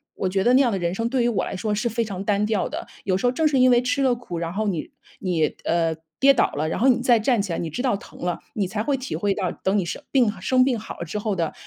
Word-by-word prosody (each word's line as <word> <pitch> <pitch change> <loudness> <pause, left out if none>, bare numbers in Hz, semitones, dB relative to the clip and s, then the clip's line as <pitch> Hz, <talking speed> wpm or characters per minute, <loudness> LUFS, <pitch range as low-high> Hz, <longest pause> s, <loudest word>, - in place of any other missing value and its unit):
我 190 - -1
觉 190 +1 0
得 245 - +4
那 265 - +6
样 245 - +2
的 195 - -1
人 170 0 -1
生 230 +3 -1
对 255 -1 +1
于 240 - +2
我 215 -5 0
来 - - -5
说 210 +3 -2
是 225 +3 -1
非 230 +1 -1
常 195 -2 -5
单 205 0 +1
调 210 -3 0
的， - - -6 0.2
有 185 -2 +1
时 195 - -2
候 245 - +4
正 315 +5 0
是 280 -3 +2
因 255 0 +6
为 240 0 +5
吃 250 +3 0
了 255 -2 +3
苦， 210 -8 -6
然 170 0 -3
后 215 +2 -1
你 175 -6 -2 0.3
你 175 -4 +1 0.2
呃， 165 -1 +1 0.2
跌 275 +1 +6
倒 245 - +2
了， 150 +2 -1
然 - - -2
后 260 - +3
你 250 -1 +4
再 240 -3 +5
站 235 +2 +2
起 195 -4 -3
来， - - -2
你 165 - -3
知 160 - -4
道 250 -6 +2
疼 - - -14
了， 175 -1 -1
你 205 - 0
才 210 +3 -3
会 280 +2 0
体 260 0 -5
会 205 -1 0
到 185 -4 -1
等 190 +2 -1
你 190 - 0
生 170 - -5
病 250 -6 +3
生 255 +6 +3
病 255 -3 +1
好 220 - -8
了 170 - -4
之 210 +6 -4
后 210 -1 -1
的 165 -3 -1
210 Hz, 340 characters per minute, -23 LUFS, 185-245 Hz, 0.3 s, 那